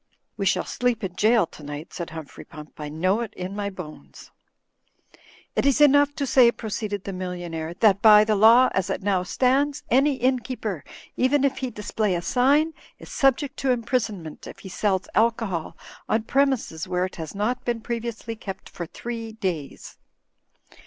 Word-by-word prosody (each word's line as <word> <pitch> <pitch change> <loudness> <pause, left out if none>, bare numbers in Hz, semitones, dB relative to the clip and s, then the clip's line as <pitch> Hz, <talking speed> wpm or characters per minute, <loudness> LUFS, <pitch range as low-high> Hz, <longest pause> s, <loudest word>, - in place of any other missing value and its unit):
''We - - -1
shall - - +1
sleep 245 -3 -1
in 185 -2 -4
jail 220 -1 +4
tonight," 150 0 -9
said 170 - -5
Humphrey 160 -3 -9
Pump. 150 -2 -12
"I 150 -1 -5
know 185 +7 +1
it 220 -2 -6
in 185 +2 -5
my 205 -1 -2
bones." 180 -6 -11 1.2
"It - - +1
is 280 0 +3
enough 285 0 +5
to 285 -3 -1
say," 250 -2 +5
proceeded 215 -3 -4
the 195 - -5
millionaire, 175 -3 -5
"that 200 -3 +5
by 210 -1 +8
the 215 0 +1
law 230 +5 +7
as 190 -2 0
it 190 - -3
now 195 -2 +1
stands, 270 +9 +1
any 275 +3 +4
innkeeper, 250 - -2 0.3
even 270 +2 +2
if 275 -1 +1
he 260 - -2
display 210 -2 -2
a 170 - -2
sign, 285 - +3 0.2
is - - -13
subject 275 0 +1
to 270 - -1
imprisonment 225 - -2
if - - -10
he 190 - -10
sells 190 0 0
alcohol 220 -7 0 0.3
on 220 0 +1
premises 260 - 0
where 180 0 0
it 185 - -8
has 160 +2 -7
not 235 +5 -1
been 240 -1 -1
pre 235 +1 -3
viously 230 0 -6
kept 195 -2 -7
for 170 - -7
diree 230 +3 -6
days." 170 -9 -4
215 Hz, 175 wpm, -24 LUFS, 185-250 Hz, 1.2 s, by